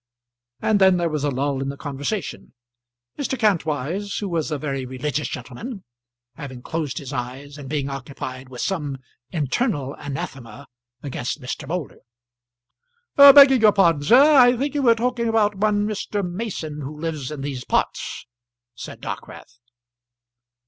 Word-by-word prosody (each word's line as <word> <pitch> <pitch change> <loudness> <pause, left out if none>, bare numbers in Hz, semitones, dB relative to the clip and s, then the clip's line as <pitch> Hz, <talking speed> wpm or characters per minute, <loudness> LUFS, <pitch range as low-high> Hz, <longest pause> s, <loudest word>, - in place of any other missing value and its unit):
And 215 -2 +2
then 190 -1 +6
there 170 -2 0
was 150 -2 -2
a 145 - +2
lull 135 0 -1
in 135 - -2
the 140 - -6
conversation, 145 +5 -5 0.6
Mr. 270 -2 -1
Kantwise, 185 - 0
who 205 - -3
was 165 -3 -1
a 150 - -2
very 135 -2 -3
religious 130 +3 -3
gentleman, 190 - -7 0.5
having 130 -2 -9
closed 160 -4 -3
his 140 0 -6
eyes, 130 +3 -5
and 135 -2 -8
being 145 -2 -1
occupied 135 -1 -7
with 125 -2 -7
some 150 -8 -2 0.3
internal 145 - -1
anathema 135 -3 -7 0.4
against 135 0 -4
Mr. 135 +2 -6
Moulder. 170 -1 -4 1.2
"Begging 280 -2 +9
your 210 -2 +6
pardon, 170 -7 +3
sir, 230 - +6 0.2
I 245 -1 +6
think 280 +4 -2
you 290 - 0
were 235 -3 +5
talking 235 0 -1
about 220 -2 +2
one 205 +1 +1
Mr. 205 -2 -2
Mason 175 -6 -5
who 150 +2 -7
lives 155 -5 -3
in 150 -2 -6
these 135 -3 -4
parts," - - -2 0.5
said - - -9
Dockwrath. 120 0 -8
150 Hz, 150 wpm, -22 LUFS, 135-205 Hz, 1.2 s, Begging